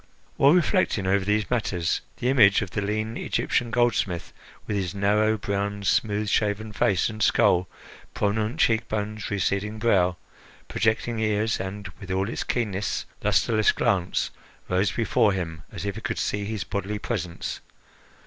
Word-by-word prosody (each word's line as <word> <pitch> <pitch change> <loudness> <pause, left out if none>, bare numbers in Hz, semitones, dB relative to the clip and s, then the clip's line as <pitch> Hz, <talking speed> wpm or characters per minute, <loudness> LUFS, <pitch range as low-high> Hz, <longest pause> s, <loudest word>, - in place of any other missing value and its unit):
While 140 +2 +5
reflecting 180 - +2
over 95 +1 +2
these 105 +3 0
matters, 90 -8 0 0.2
the 125 - -2
image 110 -7 +5
of - - -7
the 105 - -2
lean 110 +3 -2
Egyptian 120 -1 0
goldsmith, 110 -7 0 0.3
with 105 - -2
his 95 -1 -2
narrow, 105 +2 +2
brown, 100 0 -2
smooth 105 +2 +1
shaven 105 +1 0
face 95 -2 +2
and 110 0 -6
skull, 100 -5 +3 0.5
prominent 105 +2 0
cheek 110 -1 +3
bones, 105 0 -3
receding 100 +1 -1
brow, 95 -6 +2 0.5
projecting 110 +1 0
ears 110 0 +1
and, 100 +2 -5
with 100 -3 -10
all 95 +3 0
its - - -3
keenness, 105 -4 -2 0.2
lustreless 110 -2 +3
glance, 90 -3 0 0.4
rose 90 +2 +1
before 110 -2 +2
him 80 -4 -4
as - - -6
if 100 - -1
he 110 - -8
could 115 -1 -3
see 100 0 -1
his 105 -3 -3
bodily 100 +4 -3
presence. 90 -6 -4
105 Hz, 150 wpm, -25 LUFS, 100-110 Hz, 0.5 s, While